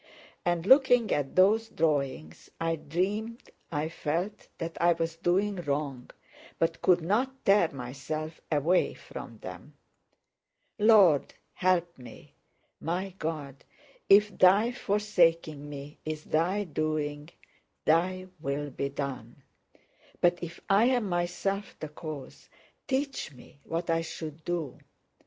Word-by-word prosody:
And 175 -1 0
looking 250 -2 +5
at 140 -2 -2
those 215 +4 +4
drawings 140 - -1
I 165 0 0
dreamed 200 +10 -3 0.2
I 150 -1 -1
felt 170 +5 -3
that 165 -1 -5
I 175 0 +5
was 165 0 -2
doing 190 +4 +1
wrong, 140 -5 -3 0.5
but 165 0 0
could 180 -2 +4
not 250 +10 -1
tear 195 -4 +5
myself 140 +5 -5
away 160 +5 +2
from - - -9
them. - - -9 1.0
Lord, 205 -9 +5 0.2
help 175 -3 +1
me! 125 -2 -13 0.5
My 180 +3 -3
God, 150 -4 -4 0.5
if 205 0 +6
Thy 200 +6 +5
forsaking 170 -9 +1
me 145 +1 -9
is 155 -1 -4
Thy 180 +6 +1
doing, 155 -2 -2 0.6
Thy 185 +4 +2
will 145 0 -3
be 140 +2 -2
done; 135 -3 -6 0.8
but 175 0 +3
if 170 0 -7
I 200 +3 +5
am 245 -4 +2
myself 175 +3 -2
the 155 - -5
cause, 150 -2 -9 0.4
teach 270 - -2
me 135 +3 -16
what 170 +1 -3
I 165 0 +2
should 160 -1 -7
do! 170 -6 -3
165 Hz, 120 wpm, -29 LUFS, 150-195 Hz, 1.0 s, if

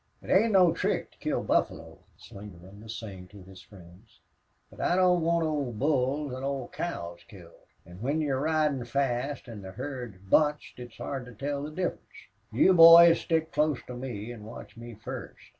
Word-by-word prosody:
"It - - -6
ain't 220 +3 +4
no 180 -4 +5
trick - - -2
to - - -27
kill - - -2
buffalo," - - -1 0.2
Slingerland 100 0 -13
was 110 0 -7
saying 95 -5 -9
to 100 0 -14
his 95 0 -14
friends. 90 -2 -18 0.5
"But - - -10
I 175 - +2
don't 180 -1 +3
want 170 0 +1
old 145 -7 -2
bulls 140 +1 0
an' 130 +1 -6
old 135 -2 -4
cows 85 - -5
killed. 85 -5 -16 0.2
An' 90 +3 -13
when 140 +6 -1
you're 140 -4 -1
ridin' 150 -4 0
fast 135 +2 -2
an' 110 -4 -9
the 95 -1 -9
herd 125 -3 -6
is 95 - -21
bunched 150 +9 +1
it's 120 -1 -10
hard 135 -3 -5
to 125 - -12
tell 140 +4 -3
the 145 - -5
difference. 180 +3 -3 0.5
You 190 - +4
boys 170 0 +9
stick 160 -1 -1
close 150 -3 +1
to 125 - -8
me 120 -3 -6
an' 110 -3 -11
watch 110 +2 -11
me 120 0 -10
first. 110 +2 -9
130 Hz, 190 wpm, -28 LUFS, 105-155 Hz, 0.5 s, boys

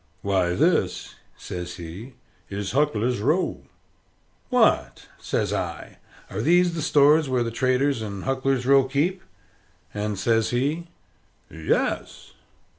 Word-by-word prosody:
"Why, 95 -3 +1
this," - - +1 0.2
says 90 0 -6
he, 90 +10 -9 0.4
"is 100 -1 -4
Huckler's 125 -4 +1
Row." 155 - 0 0.9
"What!" - - +2
says - - -1
I, - - -5 0.3
"are 100 - -4
these 175 +6 +3
the 165 - -3
stores 150 0 +4
where 125 -2 +1
the 115 - -3
traders 130 +1 +1
in 100 -3 -6
Huckler's 135 -1 0
Row 135 0 +5
keep?" 155 +8 0 0.7
And 105 -1 -3
says 115 +3 +1
he, 145 +8 -1 0.6
"Yes." 80 -1 -2
125 Hz, 115 wpm, -24 LUFS, 105-145 Hz, 0.9 s, Row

